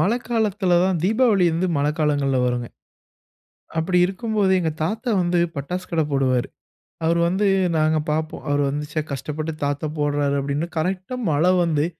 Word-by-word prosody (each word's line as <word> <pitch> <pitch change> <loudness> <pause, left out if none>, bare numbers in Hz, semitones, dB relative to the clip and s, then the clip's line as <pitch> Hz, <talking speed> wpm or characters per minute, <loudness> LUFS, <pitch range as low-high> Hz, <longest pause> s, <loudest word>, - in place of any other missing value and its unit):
மழைக்காலத்தில 215 -4 +1
தான் 185 -3 +1
தீபாவளி 215 -2 +3
வந்து 180 +3 0
மழைக்காலங்கள்ல 145 -2 +1
வரும்ங்க. 120 -1 -2 1.1
அப்பிடி 180 +2 +1
இருக்கும்போது, 205 -1 0
எங்க 160 -2 -1
தாத்தா 225 +7 -2
வந்து 175 0 +1 0.2
பட்டாசு 180 +6 -4
கடை 160 -2 +1
போடுவாரு. 130 -3 +1 0.6
அவரு 170 +1 +2
வந்து 195 +4 +1 0.3
நாங்க 155 0 +2
பார்ப்போம். 155 +1 -3
அவரு 145 0 +2
வந்து 150 +2 -3
"ச்சே, 155 0 -1
கஷ்டப்பட்டு 150 +4 -4
தாத்தா 145 +2 -2
போடுறாரு" 145 -1 +1
அப்பிடின்னு. 140 +4 -2
கரெக்ட்டா 185 +8 -2 0.2
மழை 165 +5 +3
வந்து 155 -3 +1
160 Hz, 140 wpm, -22 LUFS, 145-185 Hz, 1.1 s, தீபாவளி